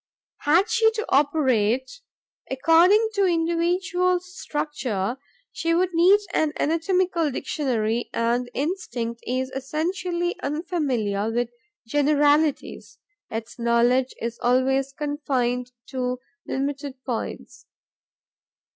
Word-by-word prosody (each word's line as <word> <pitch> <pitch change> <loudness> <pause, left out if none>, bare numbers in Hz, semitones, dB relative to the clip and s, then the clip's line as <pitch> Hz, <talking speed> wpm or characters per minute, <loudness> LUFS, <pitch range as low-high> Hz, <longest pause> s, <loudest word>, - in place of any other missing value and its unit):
Had 340 +7 +3
she 450 0 +4
to 440 0 -3
operate 265 - +2 0.5
according 345 +11 +4
to 400 -1 +2
individual 355 +2 +1
structure, 295 - -3 0.3
she 330 0 0
would 365 +1 +1
need 360 +5 +6
an 310 -1 +1
anatomical 335 +1 +1
dictionary; 240 -5 -1
and 240 +1 0
instinct 245 -7 -3
is 260 +1 -1
essentially 345 +6 -2
unfamiliar 275 - -1
with 240 +1 0 0.4
generalities: 290 +3 +1 0.3
its 225 +2 -6
knowledge 240 +2 +2
is 235 0 -4
always 265 +2 +2
confined 265 -4 -2 0.2
to 250 -1 -2 0.3
limited 280 0 -3
points. 245 -4 -5
290 Hz, 95 wpm, -24 LUFS, 250-340 Hz, 0.5 s, need